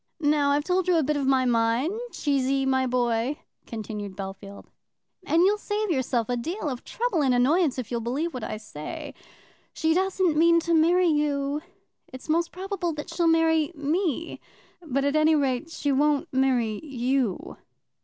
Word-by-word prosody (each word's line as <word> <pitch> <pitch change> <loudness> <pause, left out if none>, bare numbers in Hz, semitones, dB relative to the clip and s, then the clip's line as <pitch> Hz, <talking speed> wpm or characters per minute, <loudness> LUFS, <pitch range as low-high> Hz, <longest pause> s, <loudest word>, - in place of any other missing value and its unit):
"Now 295 -2 +2
I've 290 +1 +2
told 365 +2 0
you 360 - +3
a 320 - +2
bit 300 +2 0
of 280 -2 -1
my 265 -1 +3
mind, 235 - +1 0.2
Cheesy, 275 -2 0
my 260 -1 +1
boy," 245 +2 0 0.3
continued 210 -4 -6
Bellfield, 195 +1 -8 0.6
"and 330 +2 +4
you'll 410 +2 +3
save 415 -1 -2
yourself 255 -5 0
a 245 - -1
deal 330 - -4
of 255 -3 -6
trouble 450 -8 -1
and 260 -3 +3
annoyance 285 +4 +2
if 250 -3 -5
you'll 235 -1 -1
believe 285 +9 -2
what 250 -3 -5
I - - -4
say. 180 -9 -8 0.6
She 320 0 +1
doesn't 375 -2 +1
mean 335 +1 +5
to 335 +1 -1
marry 340 +3 +4
you. 295 -2 0 0.5
It's 260 +3 -11
most 335 +2 +1
probable 375 -2 -3
that 295 -1 -7
she'll 340 -2 +1
marry 325 -1 +3
me; 325 +2 -2 0.4
but, 275 -4 -1
at 285 +1 +1
any 310 +1 +4
rate, 275 +1 0
she 290 -3 -2
won't 295 +3 +2
marry 250 -4 +1
you." 255 - -2
285 Hz, 170 wpm, -26 LUFS, 250-330 Hz, 0.6 s, mean